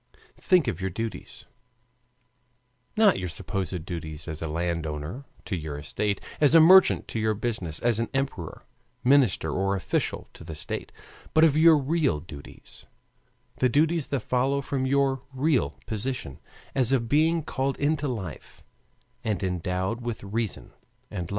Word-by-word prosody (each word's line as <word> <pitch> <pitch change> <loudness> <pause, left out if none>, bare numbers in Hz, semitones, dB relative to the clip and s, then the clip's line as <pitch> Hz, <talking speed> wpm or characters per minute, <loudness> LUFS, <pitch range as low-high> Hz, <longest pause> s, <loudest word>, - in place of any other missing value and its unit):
Think 180 -8 +3
of 95 -6 -2
your 95 - -1
duties 115 +5 -6 1.5
not 215 -3 +5
your 90 -1 -3
supposed 90 0 -4
duties 80 -4 -6
as 80 -1 -4
a 80 - -2
landowner 85 - -3 0.2
to 100 - -2
your 80 -4 -5
estate, 100 +7 -2 0.2
as 150 +1 +5
a - - +10
merchant 185 +4 +7
to 115 - -2
your 110 0 +1
business, 105 -8 -3
as 115 -2 +1
emperor, 135 - -3 0.4
minister, 130 -5 +3
or 95 +1 0
official 95 - -2
to - - -12
the 80 -1 -7
state, 75 - -5 0.4
but 160 - +6
of 155 -3 +5
your 160 0 +7
real 145 - +1
duties, 75 -3 -12 0.7
the 130 - +3
duties 160 +3 +2
that 140 -4 -1
follow 130 +4 +1
from 135 -1 -2
your 135 -1 +2
real 135 +1 +1
position 110 - -3 0.3
as 130 -2 +3
a 135 - +4
being 155 +7 +2
called 135 -1 -2
into 145 0 0
life 95 - -7 0.6
and 105 -3 -1
endowed 95 +4 -2
with 120 -3 -5
reason 105 +1 -3 0.4
and 90 -4 -4
love. - - -11
115 Hz, 150 wpm, -26 LUFS, 90-140 Hz, 1.5 s, a